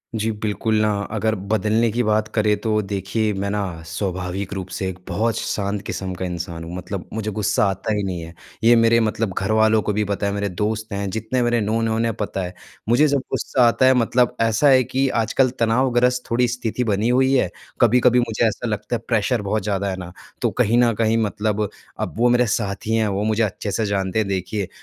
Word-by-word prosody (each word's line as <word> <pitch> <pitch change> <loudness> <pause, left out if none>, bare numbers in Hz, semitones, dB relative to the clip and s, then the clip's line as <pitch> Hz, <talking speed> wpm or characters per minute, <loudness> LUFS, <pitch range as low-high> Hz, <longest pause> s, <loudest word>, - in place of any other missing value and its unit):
जी, 110 +1 0
बिल्कुल, 105 +1 0
अगर 105 +1 -1 0.2
बदलने 110 +2 +2
की 120 +3 0
बात 110 0 +1
करें 105 -1 +3
तो 110 -1 +1
देखिए 100 +2 -1
मैं 100 +1 -2
ना 105 0 -1 0.3
स्वाभाविक 90 +2 -3
रूप 95 -2 -5
से 95 - -2
एक 95 - -7
बहुत 110 +6 0
श - - -3
शांत 100 0 -2
किस्म 95 -1 -4
का 90 +1 -4
इंसान 85 -2 -5
हूँ 85 +2 -7
मतलब 90 0 -5
मुझे 110 -1 -3
गुस्सा 105 0 +1
आता 95 +3 -2
ही 105 -1 -1
नहीं 90 -3 -3
है। 85 0 -9 0.3
ये 120 +1 +7
मेरे 115 0 +4
मतलब 110 -2 -1
घरवालों 110 +2 +3
को 105 - -1
भी 105 +1 +1
पता 100 0 -2
है, 100 - -1
मेरे 100 0 -1
दोस्त 110 +4 -3
हैं 100 0 -2
जितने 110 +5 -2
मेरे 120 -1 +1
नोन 115 +2 0
हैं, 110 - 0
उन्हें 115 0 0
पता 105 -2 -3
है। 90 - -7 0.4
मुझे 125 +6 +5
जब 140 -1 +2
गुस्सा 125 -2 +2
आता 120 +2 +3
है 130 - +6
मतलब 125 0 +2
ऐसा 115 +5 +3
है 130 -1 +6
कि 135 +3 0
आजकल 120 +3 +2
तनावग्रस्त 125 +1 +2
थोड़ी 120 +1 +3
स्थिति 120 0 -2
बनी 110 0 0
हुई 130 +2 +3
है, 135 - +2 0.3
कभी-कभी 125 +1 +5
मुझे 120 -1 0
ऐसा 110 +2 -3
लगता 105 +2 -2
है 115 - -4
प्रेशर 115 0 +1
बहुत 105 +1 -1
ज़्यादा 100 -1 -1
है 95 - -2
ना, 90 -1 -7 0.3
तो - - +2
कहीं 115 +3 +3
न 120 -1 +4
कहीं 115 0 +2
मतलब 105 0 -1 0.3
अब - - -3
वो 120 +2 +4
मेरे 120 0 +4
साथी 110 -1 -1
हैं, 110 -1 +2
वो 100 0 -1
मुझे 110 +1 +1
अच्छे 105 0 -3
से 110 +3 0
जानते 100 0 -1
हैं। 110 - 0
देखिए, 95 +1 -2
110 Hz, 220 wpm, -21 LUFS, 100-115 Hz, 0.4 s, ये